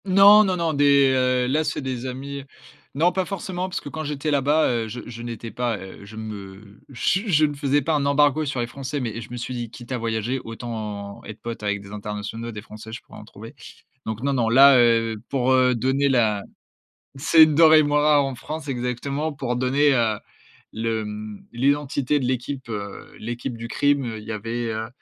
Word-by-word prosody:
Non, 200 +2 +8
non, 190 -3 0
non, 165 -2 0
des, 140 -1 +5
heu, 125 -1 +2
là, 150 +5 +1
c'est 150 -1 -2
des 130 -2 -4
amis. 140 +2 -6 0.5
Non, 165 +5 +3
pas 190 - 0
forcément, 185 0 -4
parce - - -4
que - - -10
quand 155 +2 -5
j'étais 150 0 -2
là-bas, 145 +2 +3
heu, 115 -2 -1
je 120 +3 -6
je 120 -1 -8
n'étais 115 -1 -6
pas, 120 -3 -1
heu, 95 +1 -11
je 105 +2 -12
me 100 -1 -9
je 140 +8 0
je 155 -5 +4
ne 145 - -2
faisais 140 0 +1
pas 160 - 0
un 145 -2 +1
embargo 145 +1 +3
sur 140 -3 -3
les - - 0
français, 135 +3 -5
mais 115 -3 -4
je 110 - -10
me 125 - -5
suis 120 +2 -5
dit: 120 -2 -4
«Quitte 120 0 -11
à 125 - -1
voyager, 115 +3 -2
autant 110 -3 -6
être 110 0 -9
pote 115 -1 -6
avec 105 -1 -1
des 100 - -12
internationaux, 105 +2 -5
des 105 -2 -8
français, 110 +1 -11
je 115 - -7
pourrai - - -13
en - - -12
trouver». - - -12 0.5
Donc 110 +2 -4
non 140 0 +1
non, 120 -4 +1
là, 135 +3 +8
heu, 115 -2 +2
pour, 130 -1 +1
heu, 130 -1 +4
donner 135 +4 +1
la, 110 -6 +2 0.7
c'est 160 +4 +6
une 155 -1 +3
denrée 160 0 +7
moins 145 0 +2
rare 150 -1 +4
en 135 -1 -4
France 150 +4 -7
exactement, 135 +4 -2
pour 130 -4 -3
donner, 135 +3 +3
heu, 115 -3 +1 0.6
le, 115 0 -1
hem, 105 0 -7
l'identité 140 +2 +1
de 130 - -2
l'équipe, 130 +1 -3
heu, 100 -2 -7
l'équipe 120 +2 -5
du 115 0 -7
crime, 140 -5 +1
il 105 - -10
y 110 - -4
avait, 115 +3 -3
heu, 110 0 -3
125 Hz, 210 wpm, -23 LUFS, 115-145 Hz, 0.7 s, Non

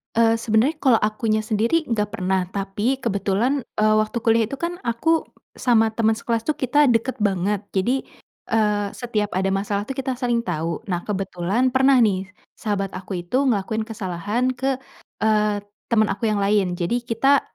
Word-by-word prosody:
Eee, 230 0 +4
sebenarnya 230 +7 +1
kalau 260 -7 +4
akunya 215 0 0
sendiri 230 +8 0
nggak 210 -2 0
pernah, 190 -3 0
tapi 205 +7 -1
kebetulan, 220 +5 0 0.2
eee, 215 0 +4
waktu 215 +2 0
kuliah 225 0 +3
itu 235 - -9
kan, 345 +1 -2
aku 315 +8 +1 0.3
sama 225 -3 +3
teman 220 0 +1
sekelas 230 0 -2
tuh 305 - +1
kita 290 +3 +2
deket 245 0 +1
banget. 200 0 0
Jadi, 245 +8 0 0.4
eee, 210 -2 +1
setiap 215 -4 -2
ada 190 +1 +1
masalah 200 +2 -2
tuh 270 - -4
kita 265 -1 -1
saling 240 -2 -1
tahu. 165 -2 -3
Nah, 175 -3 -2
kebetulan 195 +5 -1
pernah 265 0 +5
nih, 195 -5 +2 0.2
sahabat 200 -3 -3
aku 185 -1 -5
itu 255 +10 +1
ngelakuin 220 -4 0
kesalahan 215 +3 -2
ke, 265 +1 -1 0.5
eee, 210 -1 +1 0.2
teman 220 -3 +4
aku 215 +2 -1
yang 210 - +1
lain. 200 -3 +1
Jadi, 235 +8 -1
kita 245 +4 +3
220 Hz, 165 wpm, -22 LUFS, 200-245 Hz, 0.5 s, pernah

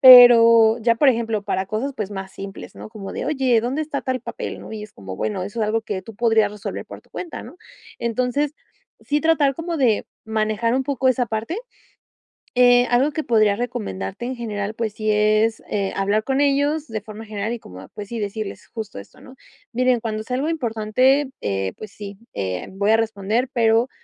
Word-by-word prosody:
pero 230 -3 +9
ya 235 +1 +3
por 270 +4 +4
ejemplo, 225 -4 +1
para 190 -1 -1
cosas, 245 +7 -2
pues 210 -1 -4
más 190 -1 -6
simples, 195 0 -9
¿no?, - - -8
como 215 -3 -8
de, - - -4
oye, 265 -6 +2
¿dónde 260 +6 -1
está 295 -2 -3
tal 255 -2 -2
papel?, - - -6
¿no? - - -10
y 215 - -5
es 215 - -14
como 95 -1 -8
bueno, 195 -4 -2
eso 205 +4 -5
es 215 - +2
algo 225 +1 0
que 205 -3 -3
tú 225 - -11
podrías 225 -2 +3
resolver 210 -1 -6
por - - -10
tu - - -30
cuenta, 345 - -6
¿no? 355 - -12 0.4
Entonces, 250 +5 0 0.5
sí 295 +1 0
tratar 300 -4 +3
como 330 +2 -3
de 245 -8 +2 0.2
manejar 220 +2 0
un 265 0 +1
poco 265 -2 +1
esa 250 -1 +2
parte. 225 - -3 1.0
Eh, 245 0 +6
algo 255 +5 +3
que 310 0 -3
podría 215 -3 +3
recomendarte 100 - -4
en 255 0 -4
general, 210 -2 -3
pues 220 -2 -2
sí 215 0 -1
es, 215 +1 +3
eh, 200 -2 -1
hablar 200 +2 +1
con 270 +3 0
ellos 290 +2 +2
de 220 -1 -4
forma 215 +2 -9
general, 215 +1 -3
y 240 - -3
como, 90 - -12
ah, 95 - -12
pues 205 -1 -7
sí, 235 -2 -4
decirles 205 0 -5
justo 220 - -6
esto, 100 - -16
¿no? 260 - -13 0.4
Miren, 250 0 +3
cuando 215 -1 -3
sea 250 +3 -3
algo 290 +4 -1
importante, 255 0 +2
eh, 95 -1 -1
pues 215 - -9
sí, 200 -2 -9 0.2
eh, 95 -2 -3
voy 200 +2 0
a - - +6
responder, 225 +2 0
pero 230 0 +3
225 Hz, 205 wpm, -22 LUFS, 210-255 Hz, 1.0 s, pero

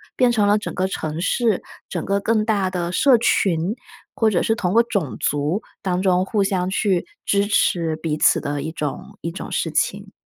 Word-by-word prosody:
变 250 -1 +3
成 210 -3 +2
了 205 +1 +4
整 210 - -5
个 185 +1 0
城 160 -3 -4
市， 220 0 +1 0.3
整 - - -3
个 200 0 0
更 215 +1 +1
大 200 -4 +1
的 175 -2 -3
社 255 +6 +5
群， 185 -3 +1 0.4
或 225 - +3
者 185 -5 +1
是 225 - +2
通 185 -2 -1
过 230 - +6
种 190 - -2
族 145 +8 0 0.2
当 185 -2 -1
中 185 -1 +2
互 200 0 +1
相 185 -2 0
去 190 -2 +1 0.2
支 200 0 +2
持 165 -5 +1
彼 155 -1 -2
此 - - +4
的 145 -1 -3
一 160 +2 -4
种， 180 +7 -5
一 165 - -3
种 180 - -7
事 - - -1
情。 - - -1
190 Hz, 215 characters per minute, -21 LUFS, 170-210 Hz, 0.4 s, 过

